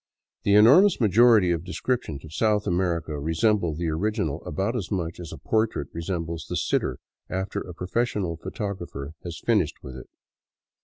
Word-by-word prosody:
The 100 - +3
enormous 150 - +7
majority 110 -3 +5
of 85 -1 -1
descriptions 90 - -3
of 80 - -12
South 105 +1 +1
America 85 -4 -1
resemble 80 +2 +1
the 85 +1 -2
original 95 -1 -1
about 100 +10 -1
as 100 -8 -3
much 85 -4 -3
as 85 -3 -7
a - - -7
portrait 110 -10 -1
resembles 85 -1 -4
the - - -2
sitter - - 0 0.3
after 95 +2 -3
a 90 - -9
professional 95 -1 -1
photographer 85 - -6
has 85 -4 -6
finished - - +2
with 65 -1 -8
it. 65 - -10
90 Hz, 155 wpm, -25 LUFS, 80-105 Hz, 0.3 s, enormous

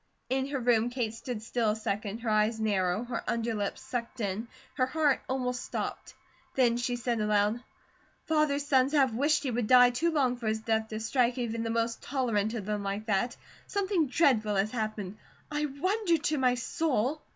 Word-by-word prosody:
In 265 0 +1
her 280 -1 -2
room 240 -1 +3
Kate 240 -3 -2
stood 230 -1 -6
still 225 -1 0
a 210 - +1
second, 215 0 -3
her 230 - -2
eyes 215 +1 +2
narrow, 200 -1 +1
her 240 -1 -4
underlip 225 -3 -1
sucked 240 0 -5
in, 210 +2 -2 0.3
her 255 - +1
heart 290 0 +2
almost 250 -1 -1
stopped. - - -5 0.4
Then 245 -3 +4
she 245 0 -1
said 240 -1 -1
aloud: 210 +2 +2 0.6
"Father's 305 -3 +1
sons 270 0 +3
have 270 -5 +4
wished 290 +7 +2
he 265 - -1
would 235 -2 -1
die 250 0 +7
too 325 +8 +1
long 265 -6 +1
for 235 -2 -5
his 220 0 0
death 220 -1 0
to 215 0 -5
strike 240 +2 +1
even 230 -2 -2
the 230 - -2
most 230 0 -1
tolerant 235 -5 0
of 210 -4 -4
them 210 0 -2
like 200 +2 -3
that. 220 +3 0 0.3
Something 385 -6 +1
dreadful 245 -7 +2
has 195 +2 +1
happened. 215 -4 -4 0.3
I 300 0 0
wonder 345 +6 +1
to 300 -1 -1
my 250 -1 +3
soul 275 +1 -1
240 Hz, 185 wpm, -29 LUFS, 220-265 Hz, 0.6 s, die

